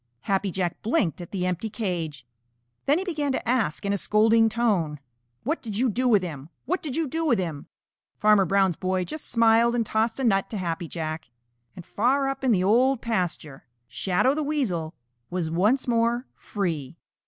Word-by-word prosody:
Happy 195 0 0
Jack 180 -2 -2
blinked 210 - 0
at 175 - -8
the 185 -3 -2
empty 180 +4 -2
cage. 170 - -4 0.6
Then 290 +3 +4
he 370 - -2
began 300 -7 -1
to 260 - -3
ask 230 -9 0
in 200 - +1
a 200 - -1
scolding 225 +3 +4
tone, 200 -10 0 0.4
"What 310 +7 -1
did 215 -4 -5
you 250 0 +2
do 255 +4 0
with 210 -6 +4
him? 150 -4 -6 0.2
What 365 +3 -1
did 285 -4 -5
you 325 -2 0
do 325 +5 -2
with 255 -8 +3
him?" 165 -6 -4 0.5
Farmer 210 -2 +5
Brown's 195 -2 +2
boy 185 +1 -1
just 310 - -7
smiled 230 0 +4
and 235 -2 +1
tossed 220 +3 0
a - - -1
nut 195 -5 +2
to 215 - -4
Happy 170 -2 -3
Jack. 155 -3 -5 0.5
And 175 - -10
far 270 +6 +1
up 270 0 -5
in 260 - +3
the 185 -4 +3
Old 245 +6 +3
Pasture, 175 - -3 0.2
Shadow 185 - +1
the 310 - -2
Weasel 210 - -2 0.3
was 175 -3 -2
once 210 +12 +2
more 235 +1 +1
free. 165 -8 -4
210 Hz, 190 wpm, -25 LUFS, 180-245 Hz, 0.6 s, Farmer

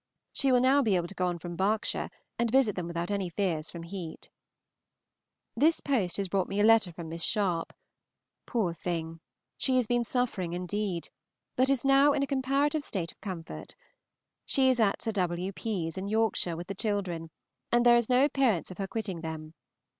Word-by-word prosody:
She 275 - +2
will 250 -1 +5
now 270 +3 +5
be 215 -7 +2
able 175 -1 +1
to - - -7
go 180 -1 0
on 175 -1 -1
from 175 +1 -7
Berks 205 +4 +1
and 235 0 -4
visit 250 -4 +3
them 180 -2 -3
without 170 +2 -3
any 195 -3 -1
fears 165 -3 -1
from 170 -1 -8
heat. 170 -2 -7 1.2
This 310 +7 +3
post 225 -11 0
has 200 -1 -1
brought 190 0 0
me 200 - -2
a - - +4
letter 220 -4 +5
from 170 0 -8
Miss 165 +1 -5
Sharpe. 180 -4 0 0.8
Poor 205 -8 0
thing! 165 -1 -4 0.4
she 260 - +2
has 250 - +3
been 240 +2 +1
suffering 230 -8 -1
indeed, 180 0 -3 0.5
but 260 +1 +3
is 275 -2 +1
now 275 +1 +6
in 280 - +1
a - - +2
comparative 275 +2 +1
state 180 - -3
of - - -29
comfort. 165 - -7 0.7
She 265 -1 +4
is 250 - -1
at 210 -3 +2
Sir 225 - 0
W. 180 -2 -1
P.'s, 190 -5 -3
in 195 - -4
Yorkshire, 215 -6 +1
with 175 - -6
the 195 - -5
children, 190 -5 -2 0.4
and 240 0 +3
there 240 0 +8
is 235 -1 +2
no 255 +2 +5
appearance 255 - +1
of 185 - -10
her 195 - -2
quitting 195 -6 -4
them. 160 -1 -6
200 Hz, 190 wpm, -29 LUFS, 175-240 Hz, 1.2 s, there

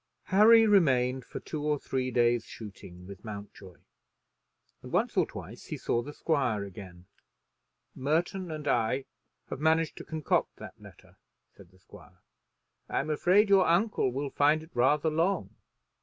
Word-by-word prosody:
Harry 225 +3 +7
remained 130 - +3
for - - -8
two 155 - -6
or 150 0 +1
three 130 -2 -3
days' 120 -1 +2
shooting 95 -4 -11
with 100 0 -11
Mountjoy, 100 -3 -10 1.1
and - - -11
once - - 0
or - - +2
twice - - -10
he - - -6
saw 120 - -1
the 145 - -8
squire 135 -10 -1
again. 90 -2 -11 0.9
"Merton 170 +6 -1
and 155 -2 -6
I 125 +1 0 0.5
have - - -4
managed 160 +1 +1
to - - -7
concoct 155 -2 -1
that - - -12
letter," - - -17 0.4
said 95 -3 -16
the 95 - -24
squire. 90 - -17 0.7
"I'm 155 - -1
afraid 185 +7 +3
your 195 -3 +4
uncle 175 - +1
will 135 +2 -4
find 150 +2 +2
it 160 - -16
rather 145 +6 +2
long. 170 +5 0
145 Hz, 150 wpm, -29 LUFS, 115-165 Hz, 1.1 s, Harry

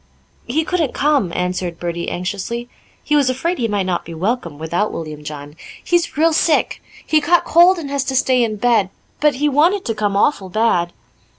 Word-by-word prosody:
"He 300 +7 0
couldn't 330 -7 -1
come," 280 - +1
answered 180 -1 -2
Bertie 170 0 -3
anxiously 205 +6 -4 0.4
he 300 - +1
was 280 -3 +3
afraid 330 +8 -2
he 235 - +1
might 205 -3 -1
not 180 -2 -1
be 165 - -9
welcome 180 -3 -2
without 170 +7 -1
William 155 -2 -7
John. 145 0 -8 0.3
"He's 340 -5 0
real 325 +1 +3
sick. 310 0 +1 0.2
He 310 -1 +2
caught 345 +4 +2
cold 350 +3 +5
and 290 -5 -6
has 280 -2 0
to 265 - -2
stay 255 -1 +3
in 220 -2 -1
bed; 215 -3 +2 0.3
but 295 -2 +3
he 295 +3 0
wanted 330 +8 +2
to 225 - -1
come 205 -2 -1
awful 200 -4 +1
bad." 180 -4 +1
235 Hz, 190 wpm, -18 LUFS, 180-295 Hz, 0.4 s, cold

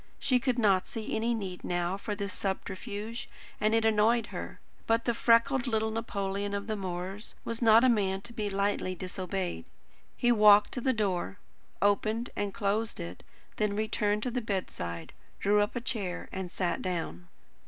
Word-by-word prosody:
She 255 -2 +2
could 255 -1 0
not 200 -5 +3
see 225 -5 -4
any 230 +2 +1
need 190 -5 -5
now 175 +1 0
for 205 +1 -4
this 200 0 -4
subterfuge, 205 +3 -4 0.3
and 215 +1 +3
it 225 0 +3
annoyed 220 +2 +4
her. - - -6 0.3
But 230 0 +2
the 235 - +2
freckled 230 +3 +3
little 220 -2 +1
Napoleon 200 -2 -2
of 200 0 -3
the 215 0 -2
moors 190 +2 -5
was 230 +1 -3
not 225 0 +7
a - - +6
man 195 -5 +2
to 235 +3 -9
be 210 -2 -2
lightly 200 -1 0
disobeyed. 185 - -3 0.5
He 240 - +3
walked 210 -2 +7
to 250 - -2
the 260 - +3
door, 200 -4 -1 0.5
opened 215 +3 +1
and 205 -1 -1
closed 210 +2 -1
it; 85 +1 -6 0.4
then 210 -1 +1
returned 210 -1 0
to 250 - -1
the 250 +1 -1
bedside, 85 - -4 0.3
drew 205 +1 +4
up 205 - -1
a 240 - -1
chair, 200 -7 -3
and 190 -1 -4
sat 180 0 -1
down. 165 - -3
205 Hz, 175 wpm, -30 LUFS, 190-225 Hz, 0.5 s, not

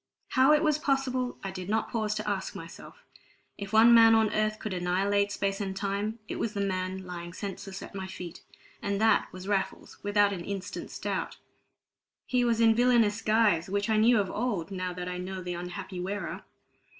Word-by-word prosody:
How 260 +2 +5
it 300 +1 +4
was 305 -2 +2
possible, 260 -3 0
I 195 - -3
did 185 0 -7
not 220 +1 0
pause 215 -2 -1
to 215 0 -4
ask - - -2
myself; - - -11 0.6
if 200 -1 -6
one 225 +2 +7
man 225 -1 +8
on 220 -1 +3
earth 215 0 +1
could 215 -2 -5
annihilate 195 +3 +1
space 195 0 -1
and 190 -1 -3
time, 200 +2 -2
it - - -5
was 225 - -1
the 205 - -3
man 185 -1 -2
lying 175 -1 -7
senseless 195 0 -6
at - - -10
my 190 -1 -5
feet; 180 -2 -8 0.4
and 200 0 -1
that 220 +1 +3
was 185 +1 -9
Raffles, 200 -2 -2
without 205 0 +3
an 175 -3 -5
instant's 195 +1 -6
doubt. - - -3 0.9
He 250 -1 +1
was 235 -2 +2
in 225 -1 +6
villainous 230 -3 +3
guise, 215 -6 +3
which 205 +3 0
I 215 - +3
knew 225 +1 +5
of 195 -2 -1
old, 205 -6 -2
now 185 -1 -3
that 180 0 -6
I 180 0 -4
knew 190 +1 -5
the 180 0 -3
unhappy 180 +2 -6
wearer. 195 +3 -4
200 Hz, 195 wpm, -29 LUFS, 185-225 Hz, 0.9 s, man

